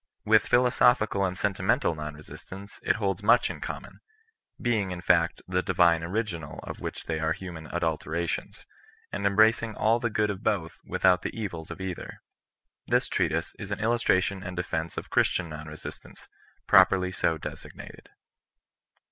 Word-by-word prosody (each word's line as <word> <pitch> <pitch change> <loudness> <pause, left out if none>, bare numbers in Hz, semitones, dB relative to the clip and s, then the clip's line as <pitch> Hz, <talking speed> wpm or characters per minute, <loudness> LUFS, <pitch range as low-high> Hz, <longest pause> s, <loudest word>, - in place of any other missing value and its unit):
With 110 -1 +4
philosophical 120 -4 +3
and 90 -1 -1
senti 100 -1 -1
mental - - +2
non 75 -1 -6
resistance 95 +6 -11
it - - +2
holds 100 -3 -1
much 120 +4 +4
in - - -10
common; - - -7 0.6
being, 110 -5 0
in 90 -1 -5
fact, 85 -1 +2
the 90 0 +1
divine 85 -3 +3
original 85 -3 -3
of - - -7
which - - -5
they 80 -1 -2
are 80 +1 +1
human 85 -3 -8
adulterations, 80 0 -3 0.5
and 100 0 0
embracing 110 +2 +3
all 115 +2 +2
the 120 - -1
good 105 -1 +1
of 95 -1 -7
both 85 -8 -1
without 90 -1 +3
the - - -2
evUs 85 -8 -5
of - - -7
either. 95 -2 -6 0.7
This 125 +2 +2
treatise 85 -3 -1
is 100 - -6
an 100 - -3
illustration 105 -4 +1
and 90 -1 -7
defence 85 -2 -3
of - - -6
Christian 85 -3 +2
non 75 0 -8
resistance, 75 0 -10 0.4
properly 90 0 +5
so 80 -3 0
desig - - -8
nated. - - -11
95 Hz, 160 wpm, -27 LUFS, 85-105 Hz, 0.7 s, properly